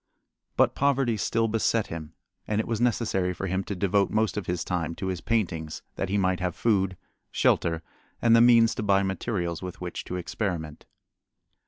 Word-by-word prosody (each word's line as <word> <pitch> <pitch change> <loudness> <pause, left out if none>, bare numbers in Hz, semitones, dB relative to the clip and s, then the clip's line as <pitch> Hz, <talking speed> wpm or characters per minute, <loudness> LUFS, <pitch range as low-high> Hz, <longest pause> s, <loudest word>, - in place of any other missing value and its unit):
But - - +4
poverty 135 -4 +2
still 115 +3 0
beset 115 0 +1
him 80 -2 -8 0.3
and 105 0 0
it 110 - 0
was 115 -1 -2
necessary 105 -7 +1
for 100 - -4
him 95 +1 -1
to 100 - -4
devote 100 +1 +2
most 110 0 +1
of 105 - -4
his 90 -1 -1
time 85 -2 -2
to - - -5
his 90 -2 -3
paintings, 85 -9 -2
that - - -3
he 100 - +1
might 95 -2 +1
have 90 -2 -2
food, 95 -5 +1 0.3
shelter, 80 -1 +1 0.4
and 115 -1 +5
the 115 - +6
means 115 -1 +6
to - - -4
buy 100 -2 +3
materials 95 -3 -2
with 90 -1 -7
which 90 -1 -5
to 90 - -5
experiment. 85 -4 -4
95 Hz, 185 wpm, -27 LUFS, 90-110 Hz, 0.4 s, the